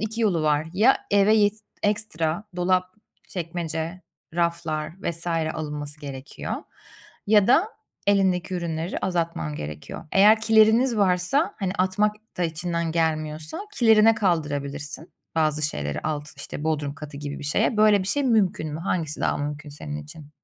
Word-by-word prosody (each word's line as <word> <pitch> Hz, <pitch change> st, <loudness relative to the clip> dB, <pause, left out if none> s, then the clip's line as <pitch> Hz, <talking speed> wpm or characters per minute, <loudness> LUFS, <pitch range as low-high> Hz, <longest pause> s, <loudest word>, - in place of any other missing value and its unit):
2 220 Hz, +1 st, -3 dB
yolu 175 Hz, -7 st, +2 dB
var. 150 Hz, +1 st, +2 dB
Ya 220 Hz, +8 st, +5 dB
eve 205 Hz, +2 st, +5 dB
yet 205 Hz, -1 st, +4 dB, 0.3 s
ekstra 205 Hz, -4 st, 0 dB
dolap, 180 Hz, +1 st, +2 dB, 0.4 s
çekmece, 170 Hz, 0 st, -4 dB, 0.3 s
raflar 170 Hz, -3 st, -1 dB
vs. 170 Hz, -2 st, -3 dB
alınması 155 Hz, -3 st, -2 dB
gerekiyor 135 Hz, -1 st, -6 dB, 0.7 s
ya 205 Hz, -1 st, +5 dB
da 340 Hz, -, +4 dB, 0.4 s
elindeki 190 Hz, -2 st, +2 dB
ürünleri 170 Hz, -1 st, -3 dB
azaltman 170 Hz, -, -2 dB
gerekiyor. 75 Hz, -, -7 dB
Eğer 210 Hz, +3 st, +6 dB
kileriniz 220 Hz, +3 st, +4 dB
varsa, 205 Hz, -, +2 dB
hani, 190 Hz, -2 st, -1 dB
atmak 205 Hz, +3 st, +2 dB, 0.2 s
da 180 Hz, -, +1 dB
içinden 170 Hz, 0 st, -2 dB
gelmiyorsa, 155 Hz, -, -1 dB
kilerine 225 Hz, -1 st, +6 dB
kaldırabilirsin 150 Hz, -5 st, -2 dB, 0.2 s
bazı 155 Hz, -1 st, +1 dB
şeyleri 75 Hz, -, -2 dB
alt 150 Hz, -1 st, -3 dB
işte, 140 Hz, +1 st, -6 dB
bodrum 150 Hz, -3 st, -1 dB
katı 145 Hz, -1 st, -9 dB
gibi 145 Hz, 0 st, -5 dB
bir -, -, -8 dB
şeye. 150 Hz, +9 st, +1 dB
Böyle 210 Hz, -1 st, +5 dB
bir 185 Hz, -, -3 dB
şey 285 Hz, +6 st, +1 dB
mümkün 190 Hz, -, +1 dB
mü? 160 Hz, -, -5 dB
Hangisi 165 Hz, -4 st, -2 dB
daha -, -, +1 dB
mümkün 145 Hz, +1 st, -4 dB
senin 75 Hz, -, -6 dB
için? 150 Hz, -, -12 dB
170 Hz, 140 wpm, -24 LUFS, 150-205 Hz, 0.7 s, Eğer